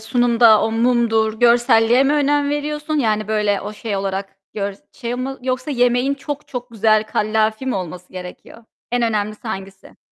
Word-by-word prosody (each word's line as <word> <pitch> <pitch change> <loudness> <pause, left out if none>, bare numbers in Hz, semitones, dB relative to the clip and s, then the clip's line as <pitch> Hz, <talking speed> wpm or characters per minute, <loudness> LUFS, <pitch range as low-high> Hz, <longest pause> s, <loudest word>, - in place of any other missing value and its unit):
sunumda 235 -1 +4
o 220 - 0
mumdur, 225 -2 +2
görselliğe 240 0 +4
mi 280 - +2
önem 290 -1 +2
veriyorsun? 300 +1 -3
Yani 215 -4 0
böyle 210 -2 +1
o 205 +2 -6
şey 210 -1 -4
olarak 195 0 -4 0.2
gör 200 -1 -3 0.2
şey 240 -1 -5
mi 265 +2 -4
yoksa 255 +2 -2
yemeğin 245 +1 +2
çok 290 +1 -7
çok 245 -1 -6
güzel, 215 -1 +2
kallavi 220 +3 0
mi 260 - 0
olması 180 -1 -6
gerekiyor? 185 +5 -10 0.3
En 245 - +1
önemlisi 215 0 -2
hangisi? 195 -1 -8
225 Hz, 160 wpm, -19 LUFS, 210-255 Hz, 0.3 s, sunumda